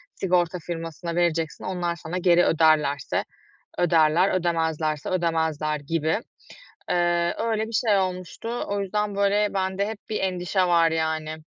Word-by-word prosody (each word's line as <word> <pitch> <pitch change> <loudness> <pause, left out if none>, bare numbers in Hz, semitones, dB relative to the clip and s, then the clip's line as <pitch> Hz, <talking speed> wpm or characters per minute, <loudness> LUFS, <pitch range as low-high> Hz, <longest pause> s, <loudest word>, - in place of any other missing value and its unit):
sigorta 180 -1 +1
firmasına 165 0 -5
vereceksin, 165 -2 0
onlar 175 -2 -2
sana 165 +2 -5
geri 175 -1 +4
öderlerse 155 -3 +2 0.6
öderler, 170 +1 +4
ödemezlerse 160 -4 -1
ödemezler." 160 -4 0
gibi. 160 +5 -1 0.7
Eee, 175 -1 +1
öyle 220 -1 -1
bir - - -9
şey 215 -2 +3
olmuştu. 185 +6 -3
O 200 0 -1
yüzden, 205 +1 -2
böyle, 200 +1 +2
bende 190 +1 0
hep 220 -2 -6
bir 215 - -1
endişe 180 -1 -1
var, 170 -1 +4
yani. 160 -1 -2
175 Hz, 130 wpm, -24 LUFS, 160-190 Hz, 0.7 s, geri